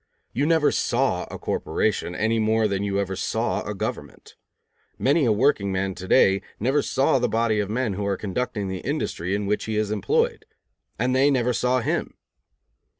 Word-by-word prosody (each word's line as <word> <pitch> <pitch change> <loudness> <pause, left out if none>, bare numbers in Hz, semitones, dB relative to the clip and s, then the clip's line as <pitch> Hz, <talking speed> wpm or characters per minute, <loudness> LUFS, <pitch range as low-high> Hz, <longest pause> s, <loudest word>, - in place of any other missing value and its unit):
You 140 +4 +1
never 160 -2 +3
saw - - 0
a - - -6
corporation, 90 - -1
any 110 +3 +1
more 110 0 +2
than 100 -1 -2
you 100 -1 -1
ever 95 -1 -2
saw 95 - -1
a - - -5
government. - - -6 0.6
Many 140 +2 +2
a 115 - +3
workingman 100 -6 +1
to 95 +1 -8
day 95 +1 +4 0.2
never 135 +7 +2
saw 135 0 +2
the 125 -1 0
body 110 -1 +1
of 100 -1 -1
men 115 -1 -1
who 100 +2 -3
are 100 -1 0
conducting 105 0 -3
the 95 0 -4
industry 100 - -2
in 105 0 -2
which 105 +1 -1
he 110 -1 -2
is 105 -1 0
employed. 105 -2 0 0.5
And 125 +3 0
they 135 +2 +4
never 125 -3 +1
saw 125 +2 +1
him. - - -2
110 Hz, 180 wpm, -24 LUFS, 100-125 Hz, 0.6 s, day